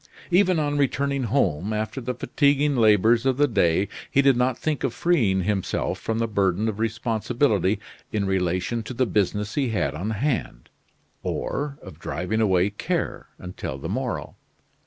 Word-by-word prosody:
Even 185 Hz, 0 st, +4 dB
on 145 Hz, -1 st, 0 dB
returning 140 Hz, -1 st, 0 dB
home 100 Hz, -, 0 dB
after 110 Hz, +5 st, -3 dB
the 125 Hz, +1 st, -3 dB
fatiguing 140 Hz, +3 st, +2 dB
labors 110 Hz, 0 st, +4 dB
of 130 Hz, -1 st, +1 dB
the 145 Hz, 0 st, +4 dB
day 95 Hz, -, +2 dB, 0.2 s
he 140 Hz, -, +3 dB
did 135 Hz, -1 st, +5 dB
not 125 Hz, 0 st, +1 dB
think 155 Hz, -3 st, -2 dB
of -, -, -1 dB
freeing 115 Hz, -, +2 dB
himself 100 Hz, -1 st, -1 dB
from 115 Hz, -, -2 dB
the 115 Hz, 0 st, 0 dB
burden 100 Hz, -1 st, +1 dB
of 110 Hz, -1 st, -3 dB
responsibility 110 Hz, -2 st, 0 dB, 0.3 s
in 105 Hz, -2 st, 0 dB
relation 95 Hz, +4 st, 0 dB
to 115 Hz, +3 st, -7 dB
the 130 Hz, -, +2 dB
business 105 Hz, -1 st, 0 dB
he 135 Hz, -4 st, 0 dB
had 90 Hz, -10 st, 0 dB
on 90 Hz, +8 st, -3 dB
hand, 110 Hz, -, -2 dB, 0.5 s
or 140 Hz, 0 st, -3 dB
of 95 Hz, -6 st, -11 dB
driving 110 Hz, +6 st, -2 dB
away 95 Hz, -2 st, +3 dB
care 105 Hz, -, -3 dB
until 90 Hz, -7 st, -6 dB
the 70 Hz, -, -6 dB
morrow. -, -, -3 dB
110 Hz, 160 wpm, -24 LUFS, 95-135 Hz, 0.5 s, did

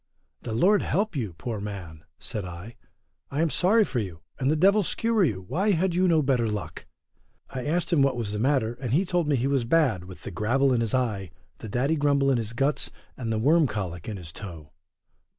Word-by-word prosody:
The 115 Hz, -, -5 dB
Lord 195 Hz, -, +4 dB
help 205 Hz, -2 st, 0 dB
you, 110 Hz, -10 st, -2 dB
poor 110 Hz, +7 st, -5 dB
man, 90 Hz, -7 st, -7 dB
said 105 Hz, -, -4 dB
I, 90 Hz, +6 st, -8 dB, 0.5 s
I 140 Hz, -, -3 dB
am 165 Hz, -, +1 dB
sorry 215 Hz, +5 st, +4 dB
for 135 Hz, -10 st, -2 dB
you, 90 Hz, -7 st, -5 dB, 0.2 s
and 130 Hz, 0 st, +1 dB
the 155 Hz, -, +3 dB
devil 200 Hz, +6 st, +5 dB
skewer 225 Hz, +2 st, +1 dB
you, 100 Hz, -, -1 dB
why 200 Hz, -, +1 dB
had 180 Hz, +1 st, +1 dB
you 185 Hz, +2 st, +3 dB
no 160 Hz, -3 st, +3 dB
better 125 Hz, -5 st, +1 dB
luck? 105 Hz, -3 st, -5 dB, 0.6 s
I 130 Hz, -2 st, -4 dB
asked 170 Hz, +3 st, 0 dB
him 155 Hz, -, +4 dB
what 135 Hz, -2 st, +3 dB
was 110 Hz, -4 st, -2 dB
the 105 Hz, -, -3 dB
matter, 125 Hz, -2 st, +2 dB
and 125 Hz, -3 st, -2 dB
he 175 Hz, +7 st, +3 dB
told 175 Hz, -3 st, 0 dB
me 145 Hz, -, +3 dB
he 125 Hz, 0 st, 0 dB
was 135 Hz, -2 st, +1 dB
bad 115 Hz, -, +2 dB
with 90 Hz, -2 st, -11 dB
the -, -, -6 dB
gravel 130 Hz, +8 st, +2 dB
in 120 Hz, -, +2 dB
his 115 Hz, +1 st, 0 dB
eye, 105 Hz, -8 st, -1 dB, 0.3 s
the 110 Hz, -, -7 dB
daddy 135 Hz, +9 st, +1 dB
grumble 140 Hz, -1 st, +3 dB
in 125 Hz, -, +2 dB
his 115 Hz, 0 st, -4 dB
guts, 135 Hz, +5 st, 0 dB, 0.3 s
and 115 Hz, -3 st, -4 dB
the 110 Hz, -, 0 dB
worm 150 Hz, +7 st, +4 dB
cholic 90 Hz, -5 st, -4 dB
in 105 Hz, -, -4 dB
his 85 Hz, -4 st, -9 dB
toe. 80 Hz, -7 st, -9 dB
125 Hz, 220 wpm, -26 LUFS, 105-155 Hz, 0.6 s, devil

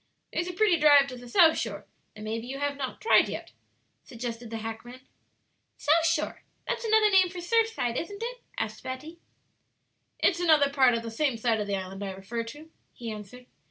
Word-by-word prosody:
"There's 335 Hz, +2 st, -1 dB
a 360 Hz, -, -4 dB
pretty 390 Hz, -2 st, +3 dB
drive 290 Hz, -2 st, +7 dB
to 255 Hz, -, -7 dB
the 245 Hz, -1 st, -11 dB
South 320 Hz, +3 st, +5 dB
Shore, 205 Hz, -3 st, -4 dB, 0.3 s
that 215 Hz, -, -9 dB
maybe 225 Hz, +2 st, -4 dB
you 270 Hz, +2 st, -5 dB
have 285 Hz, 0 st, -1 dB
not 270 Hz, -2 st, -5 dB
tried 450 Hz, -, +4 dB
yet," -, -, -6 dB, 0.5 s
suggested 235 Hz, -1 st, -6 dB
the 225 Hz, -, -4 dB
hackman. 225 Hz, +3 st, -7 dB, 0.8 s
"South 325 Hz, +3 st, +3 dB
Shore? 335 Hz, -, -1 dB, 0.3 s
That's -, -, -2 dB
another 440 Hz, -1 st, +4 dB
name 375 Hz, -2 st, +5 dB
for 365 Hz, -, -10 dB
Surfside, 400 Hz, -, 0 dB
isn't 405 Hz, +6 st, -7 dB
it?" -, -, -5 dB, 0.2 s
asked 215 Hz, 0 st, -3 dB
Betty. 300 Hz, +6 st, -7 dB, 1.0 s
"It's 345 Hz, -3 st, +2 dB
another 310 Hz, -5 st, +4 dB
part 260 Hz, -4 st, +4 dB
of 230 Hz, -, -3 dB
the 230 Hz, -, -6 dB
same 260 Hz, +1 st, 0 dB
side 225 Hz, -1 st, +1 dB
of 205 Hz, -, -3 dB
the 200 Hz, -, 0 dB
island 190 Hz, +1 st, -6 dB
I 195 Hz, -1 st, -4 dB
refer 195 Hz, +5 st, -5 dB
to," 295 Hz, +7 st, -11 dB, 0.2 s
he 230 Hz, -2 st, -6 dB
answered. 215 Hz, +4 st, -10 dB
260 Hz, 195 wpm, -28 LUFS, 230-335 Hz, 1.0 s, drive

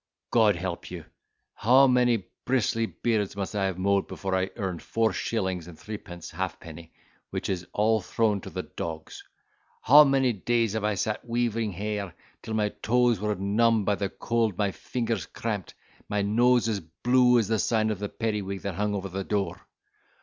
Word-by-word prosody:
God 110 Hz, -4 st, +4 dB
help 85 Hz, 0 st, -5 dB
you, 85 Hz, -3 st, -7 dB, 0.5 s
how 130 Hz, +5 st, +5 dB
many 125 Hz, -5 st, +3 dB, 0.2 s
bristly 115 Hz, -3 st, +1 dB
beards 110 Hz, -5 st, -1 dB
must 100 Hz, +1 st, -4 dB
I 100 Hz, -1 st, +1 dB
have 95 Hz, -2 st, -2 dB
mowed 100 Hz, +1 st, +1 dB
before 95 Hz, -1 st, -4 dB
I 95 Hz, 0 st, 0 dB
earned 95 Hz, -6 st, -3 dB
four 115 Hz, -1 st, 0 dB
shillings 95 Hz, -6 st, -2 dB
and 85 Hz, -3 st, -11 dB
threepence 100 Hz, -5 st, -8 dB
halfpenny, 80 Hz, 0 st, -6 dB, 0.4 s
which -, -, -4 dB
is 90 Hz, -2 st, -3 dB
all 110 Hz, +1 st, +2 dB
thrown 105 Hz, +1 st, 0 dB
to -, -, -8 dB
the -, -, -4 dB
dogs! 80 Hz, -1 st, -7 dB, 0.6 s
How 145 Hz, +5 st, +9 dB
many 135 Hz, -3 st, +2 dB
days 115 Hz, +1 st, 0 dB
have 110 Hz, -1 st, -2 dB
I 105 Hz, -1 st, +1 dB
sat 105 Hz, +2 st, -2 dB
weaving 115 Hz, -3 st, -1 dB
hair 100 Hz, -1 st, -4 dB, 0.3 s
till 110 Hz, -1 st, -4 dB
my 105 Hz, -1 st, +1 dB
toes 120 Hz, -2 st, +3 dB
were 105 Hz, +1 st, -1 dB
numbed 105 Hz, +3 st, +2 dB
by 105 Hz, -, +2 dB
the 100 Hz, -1 st, -2 dB
cold, 115 Hz, -2 st, -1 dB
my 100 Hz, -2 st, +1 dB
fingers 115 Hz, -3 st, -3 dB
cramped, 105 Hz, -6 st, -4 dB, 0.2 s
and -, -, -30 dB
my 105 Hz, 0 st, 0 dB
nose 120 Hz, +3 st, +3 dB
as 110 Hz, -3 st, 0 dB
blue 125 Hz, +9 st, +3 dB
as 115 Hz, -4 st, +2 dB
the 110 Hz, 0 st, +1 dB
sign 110 Hz, 0 st, +1 dB
of 105 Hz, -, -3 dB
the 105 Hz, 0 st, -3 dB
periwig 105 Hz, -4 st, -3 dB
that 100 Hz, -, -3 dB
hung 105 Hz, +3 st, -1 dB
over 100 Hz, -1 st, -3 dB
the 95 Hz, +1 st, -4 dB
door! 100 Hz, 0 st, -2 dB
105 Hz, 180 wpm, -27 LUFS, 95-115 Hz, 0.6 s, How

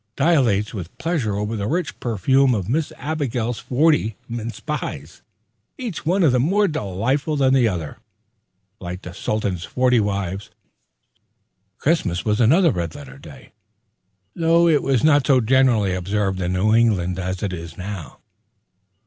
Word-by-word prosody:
dilates 120 Hz, -, +2 dB
with 95 Hz, -5 st, -7 dB
pleasure 150 Hz, -, -1 dB
over 105 Hz, +2 st, -2 dB
the 100 Hz, -1 st, -3 dB
rich 170 Hz, +2 st, -2 dB
perfume 125 Hz, +4 st, +2 dB
of 95 Hz, -4 st, -3 dB
Miss 145 Hz, +6 st, -1 dB
Abigail's 125 Hz, -7 st, -2 dB
forty 130 Hz, -3 st, +1 dB
mince 115 Hz, 0 st, -5 dB
pies, 95 Hz, -, -5 dB, 0.6 s
each 225 Hz, -11 st, -6 dB
one 185 Hz, +2 st, +2 dB, 0.2 s
more 200 Hz, +8 st, +2 dB
delightful 135 Hz, -, -1 dB
than 135 Hz, -2 st, +3 dB
the 130 Hz, -3 st, +4 dB
other, 85 Hz, -7 st, -4 dB, 0.8 s
like 90 Hz, +1 st, -7 dB
the 90 Hz, -, -8 dB
Sultan's 95 Hz, -2 st, -2 dB
forty 125 Hz, +4 st, +2 dB
wives. 100 Hz, -2 st, -2 dB, 1.3 s
Christmas 110 Hz, -, 0 dB
was 105 Hz, +1 st, +1 dB
another 160 Hz, -, +5 dB
red 85 Hz, -3 st, -4 dB
letter 70 Hz, -2 st, -11 dB
day, -, -, -14 dB, 0.8 s
though 170 Hz, +1 st, +3 dB
it 155 Hz, -4 st, +3 dB
was 130 Hz, -4 st, +1 dB
not 145 Hz, -4 st, +4 dB
so 135 Hz, -3 st, +5 dB
generally 120 Hz, -5 st, +3 dB
observed 95 Hz, +1 st, -1 dB
in 90 Hz, 0 st, -1 dB
New 100 Hz, +4 st, +2 dB
England 95 Hz, -6 st, +2 dB
as 95 Hz, +1 st, -4 dB
it 100 Hz, -2 st, -2 dB
is 85 Hz, -1 st, -8 dB
now. 95 Hz, -6 st, -7 dB
110 Hz, 140 wpm, -21 LUFS, 95-140 Hz, 1.3 s, another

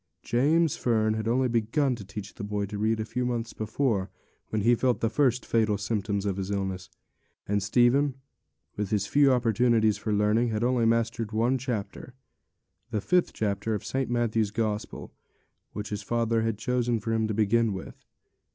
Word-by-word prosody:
James 150 Hz, +6 st, +2 dB
Fern 110 Hz, -3 st, +1 dB
had 110 Hz, 0 st, -3 dB
only 130 Hz, +3 st, +2 dB
begun 120 Hz, +4 st, +1 dB
to 115 Hz, -4 st, -7 dB
teach 100 Hz, +1 st, -8 dB
the -, -, -8 dB
boy 105 Hz, 0 st, -2 dB
to 100 Hz, +1 st, -6 dB
read 110 Hz, +1 st, +1 dB
a 110 Hz, -, -2 dB
few 125 Hz, +3 st, -3 dB
months 120 Hz, -2 st, -2 dB
before, 110 Hz, -3 st, -1 dB, 0.4 s
when 110 Hz, -2 st, -1 dB
he 120 Hz, +2 st, +5 dB
felt 120 Hz, -2 st, +1 dB
the 115 Hz, -1 st, 0 dB
first 125 Hz, -1 st, +1 dB
fatal 110 Hz, -3 st, +1 dB
symptoms 100 Hz, -1 st, -2 dB
of 100 Hz, -2 st, -1 dB
his 95 Hz, 0 st, -3 dB
illness; 95 Hz, -2 st, -3 dB, 0.6 s
and 105 Hz, 0 st, +1 dB
Stephen, 125 Hz, +7 st, +3 dB, 0.6 s
with 105 Hz, -1 st, -3 dB
his 105 Hz, -2 st, 0 dB
few 140 Hz, +5 st, +4 dB
opportunities 115 Hz, -3 st, +2 dB
for 110 Hz, -, -3 dB
learning, 105 Hz, +3 st, +2 dB
had 110 Hz, 0 st, -1 dB
only 120 Hz, -2 st, +2 dB
mastered 115 Hz, -1 st, 0 dB
one 120 Hz, +4 st, +1 dB
chapter, 120 Hz, 0 st, -5 dB, 0.7 s
the 110 Hz, -2 st, -1 dB
fifth 180 Hz, -, +2 dB
chapter 105 Hz, +1 st, -1 dB
of 105 Hz, 0 st, -6 dB
St. 135 Hz, -1 st, -2 dB
Matthew's 115 Hz, -3 st, +1 dB
Gospel, 110 Hz, 0 st, -3 dB, 0.6 s
which 105 Hz, 0 st, -5 dB
his 105 Hz, -1 st, -4 dB
father 115 Hz, +1 st, 0 dB
had 110 Hz, -2 st, -1 dB
chosen 120 Hz, 0 st, 0 dB
for 115 Hz, +2 st, -2 dB
him 110 Hz, -1 st, +1 dB
to 110 Hz, -, -2 dB
begin 110 Hz, +1 st, +2 dB
with. 95 Hz, -1 st, -8 dB
110 Hz, 180 wpm, -27 LUFS, 105-120 Hz, 0.7 s, he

